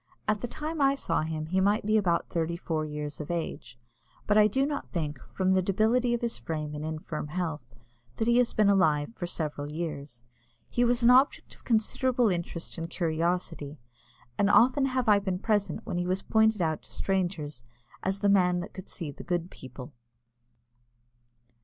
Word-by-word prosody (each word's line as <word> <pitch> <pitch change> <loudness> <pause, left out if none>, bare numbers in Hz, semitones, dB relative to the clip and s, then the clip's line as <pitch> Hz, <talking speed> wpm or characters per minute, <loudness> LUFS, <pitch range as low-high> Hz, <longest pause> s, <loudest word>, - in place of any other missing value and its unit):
At 215 -1 +1
the 245 - -2
time 305 +4 -4
I 275 0 +4
saw 275 - 0
him, 155 0 -3
he 185 +4 0
might 205 +2 +2
be 215 +1 +2
about 180 -5 +2
thirty 170 0 -1
four 160 -2 -2
years 150 0 -5
of 150 - -8
age, 170 -7 -4 0.5
but 210 - +2
I 210 0 +7
do 265 +6 +1
not 285 0 -4
think, 150 -5 -3
from 185 0 +1
the 190 0 +4
debility 225 +6 +2
of 235 - -4
his 235 -1 -1
frame 155 -2 -4
and 150 0 -5
infirm 155 -1 -4
health, 155 -5 -3 0.5
that 225 - -1
he 235 0 +4
has 245 - +3
been 215 -2 +3
alive 160 -3 +3
for 175 - -4
several 150 -4 -4
years. 150 -6 -5 0.4
He 245 - +1
was 240 0 +2
an 235 - +7
object 260 +3 +3
of - - -21
considerable 245 +1 +2
interest 170 -1 -3
and 165 0 -4
curiosity, 165 -3 -2 0.6
and 200 - +4
often 260 +6 +5
have 255 -2 -1
I 205 -1 +6
been 190 -2 -2
present 210 +2 -1
when 175 - -2
he 175 - -1
was 185 +1 -1
pointed 220 -3 +3
out 160 -1 -1
to - - -14
strangers 175 -9 -2 0.4
as 195 +1 -2
"the 205 - +3
man 180 -3 +4
that 195 - -8
could 190 - -9
see 155 -4 -4
the - - -10
good 175 0 -2
people." 130 +2 -10
180 Hz, 190 wpm, -28 LUFS, 155-220 Hz, 0.6 s, I